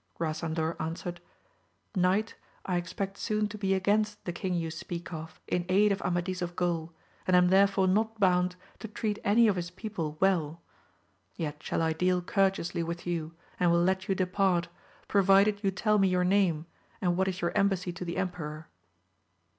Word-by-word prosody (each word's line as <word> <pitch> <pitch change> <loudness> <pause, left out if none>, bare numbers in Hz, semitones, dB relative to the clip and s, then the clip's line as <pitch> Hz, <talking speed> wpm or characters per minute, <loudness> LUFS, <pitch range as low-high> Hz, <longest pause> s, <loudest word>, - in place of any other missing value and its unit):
Grasandor 160 0 -1
an 160 +1 -2
swered, 175 0 -6 0.8
Knight, 190 +4 +2 0.3
I 180 -2 0
expect 190 +3 -4
soon 215 -1 0
to 210 - -7
be 195 -1 +1
against 210 +2 0
the 175 - -3
king 185 +1 -2
you 165 -2 -2
speak 170 +2 -6
of, 160 0 -8
in 180 - 0
aid 205 +3 +4
of 200 - -1
Amadis 180 +1 -1
of 175 0 -3
Gaul, 170 -2 -1 0.4
and 185 - +4
am 180 0 +5
there 195 +2 +6
fore 195 -1 +1
not 220 +3 +1
bound 180 -2 +3 0.2
to 220 - -6
treat 215 0 -3
any 225 +3 +5
of 200 -3 +2
his 175 -1 -3
people 175 -5 -5
well 170 -4 +1 0.7
3 - - -4
yet 150 -1 -4
shall - - -1
I 160 0 +1
deal 180 +2 +1
courteously 190 -2 0
with 170 +1 -4
you, 165 -2 -3 0.2
and 180 - +4
will 170 0 +4
let 190 +1 0
you 195 - +2
depart, 185 -2 +1 0.4
provided 200 +1 +4
you 195 - +3
tell 210 +2 +1
me 195 - +4
your 180 -1 +2
name, 180 -4 +2 0.3
and 175 -2 +1
what 190 +1 +1
is 190 -1 -2
your 170 - 0
em 200 - +4
bassy 180 -2 -3
to 180 - -6
the 170 -1 -4
emperor. 160 -4 -4
180 Hz, 190 wpm, -29 LUFS, 170-195 Hz, 0.8 s, there